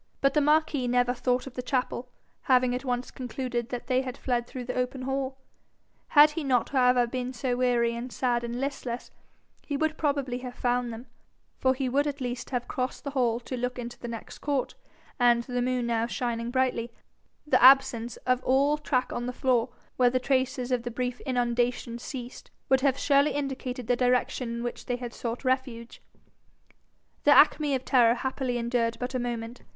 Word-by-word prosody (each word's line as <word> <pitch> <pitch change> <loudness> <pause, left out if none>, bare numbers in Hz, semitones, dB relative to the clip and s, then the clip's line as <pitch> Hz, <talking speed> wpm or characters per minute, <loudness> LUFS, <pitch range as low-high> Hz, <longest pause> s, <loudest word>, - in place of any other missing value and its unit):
But 275 0 +2
the 300 - +3
marquis 300 -3 +2
never 245 0 +2
thought 250 0 0
of 270 - -9
the 255 - -4
chapel, 250 -1 -2 0.4
having 255 -1 +4
at 250 - -3
once 250 -1 -2
concluded 245 -1 -4
that 245 -1 -5
they 255 0 +2
had 260 0 -6
fled 240 -2 -1
through 255 0 -6
the 250 - -3
open 255 +1 -2
hall. 265 0 -2 0.7
Had 295 0 +7
he 325 0 -4
not, 255 -4 +1
however, 250 -2 +4
been 255 +1 -4
so 250 0 -1
weary 240 -2 +2
and 240 +2 -6
sad 240 -2 0
and 235 +1 -4
listless, 265 -3 -4 0.5
he 285 - -3
would 315 +1 -1
probably 280 -4 0
have 250 -1 -7
found 245 -1 0
them, 230 +2 -8 0.5
for 260 0 +2
he 265 0 -2
would 280 +4 +1
at 285 -1 -3
least 250 -1 -4
have 245 -2 -2
crossed 255 -1 -3
the 280 - -4
hall 240 -4 +1
to 255 - -5
look 250 +1 -3
into 240 -1 -7
the 240 - -6
next 230 -1 -8
court, 285 -3 -1 0.5
and, 240 -1 +4
the 245 0 -2
moon 250 0 0
now 230 -1 0
shining 235 -2 -2
brightly, 250 -2 0 0.5
the 300 - +3
absence 255 -3 +5
of 255 0 +1
all 280 +3 +3
track 260 -4 -1
on 240 0 -3
the - - -2
floor 250 -1 +1 0.3
where 250 -1 +5
the 255 +1 +1
traces 260 -1 0
of 250 -2 +1
the 240 - -4
brief 250 +1 -3
inundation 240 -1 0
ceased, 245 -1 -8 0.2
would 265 0 +4
have 270 -1 +2
surely 280 +1 +3
indicated 265 -3 -4
the 245 +2 +2
direction 250 0 +1
in 235 - -4
which 240 - -5
they 245 - 0
had 245 -1 -6
sought 235 +3 -5
refuge. 255 -3 -2 1.2
The - - +3
acme 295 -2 +5
of 260 - -4
terror 240 -3 +5
happily 260 -1 -2
endured 235 -1 0
but 250 +1 -4
a 255 - 0
moment. 240 0 -4
250 Hz, 190 wpm, -27 LUFS, 240-265 Hz, 1.2 s, Had